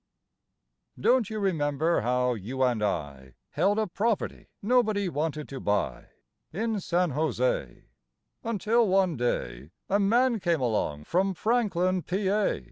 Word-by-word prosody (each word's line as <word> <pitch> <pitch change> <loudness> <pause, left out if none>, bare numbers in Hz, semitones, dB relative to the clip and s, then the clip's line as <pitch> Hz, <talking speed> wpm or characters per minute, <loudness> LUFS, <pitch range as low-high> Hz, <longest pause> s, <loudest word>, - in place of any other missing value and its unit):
Don't 240 - +3
you 220 - -4
remember 160 -5 +1
how 125 +2 +1
you 120 +5 -3
and 120 -4 +1
I 70 -10 -3 0.2
Held 195 +7 +1
a 220 - +2
property 210 +3 -2
nobody 215 -3 +2
wanted 150 -1 -3
to 135 - -6
buy 105 0 -1 0.4
In 220 +4 -1
San 175 -2 0
José, - - -1 0.6
Until 230 +1 +1
one 190 -3 +2
day 70 - -2 0.2
A 200 - +2
man 235 +4 +3
came 170 -4 +1
along 105 - -1
from 190 - 0
Franklin, 185 -4 +1
Pa.? 195 +3 0
180 Hz, 125 wpm, -27 LUFS, 130-210 Hz, 0.6 s, Don't